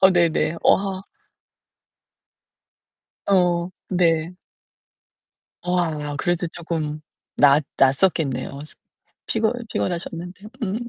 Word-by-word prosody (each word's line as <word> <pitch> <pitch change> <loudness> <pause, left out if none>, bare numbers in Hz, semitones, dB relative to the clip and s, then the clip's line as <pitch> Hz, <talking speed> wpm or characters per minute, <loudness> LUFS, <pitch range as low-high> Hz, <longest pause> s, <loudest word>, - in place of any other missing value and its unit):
어 190 - +7
네네. 170 -2 +2
어 - - +6
아. 195 -1 -4 2.2
어, 180 -2 +2 0.2
네. 170 -2 +2 1.3
어 180 0 0
아, 150 -4 -2
그래도 175 +4 0
쪼금 160 -3 -4 0.4
나았 145 +1 +6
나았었겠네요. 140 -1 +1
숙 155 - -12 0.5
피곤 220 0 +1 0.2
피곤하셨는데. 175 +2 -4 0.2
음. 195 -1 -2
170 Hz, 175 characters per minute, -23 LUFS, 155-185 Hz, 2.2 s, 어